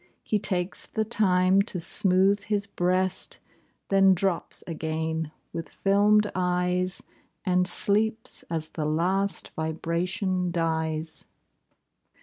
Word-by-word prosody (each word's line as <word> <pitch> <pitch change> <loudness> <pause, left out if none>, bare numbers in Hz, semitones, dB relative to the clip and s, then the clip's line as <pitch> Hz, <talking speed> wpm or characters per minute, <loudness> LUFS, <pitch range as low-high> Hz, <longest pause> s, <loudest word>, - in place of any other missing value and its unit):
He 210 - 0
takes 185 -2 +1
the 220 - -1
time 190 -3 +3
to 195 -3 -2
smooth 195 +3 +3
his 205 -1 0
breast. 185 -1 -1 0.5
Then 195 -1 +5
drops 185 -1 -2
again 160 -1 -3 0.2
with 165 -1 -5
fdmed 210 +1 +4
eyes, 180 0 0 0.4
And 180 0 +2
sleeps 220 +4 +1
as 160 -1 -3
the 155 - -4
last 185 +6 0
vibration 175 +4 -2
dies. 160 -2 -2
180 Hz, 105 wpm, -26 LUFS, 165-195 Hz, 0.5 s, Then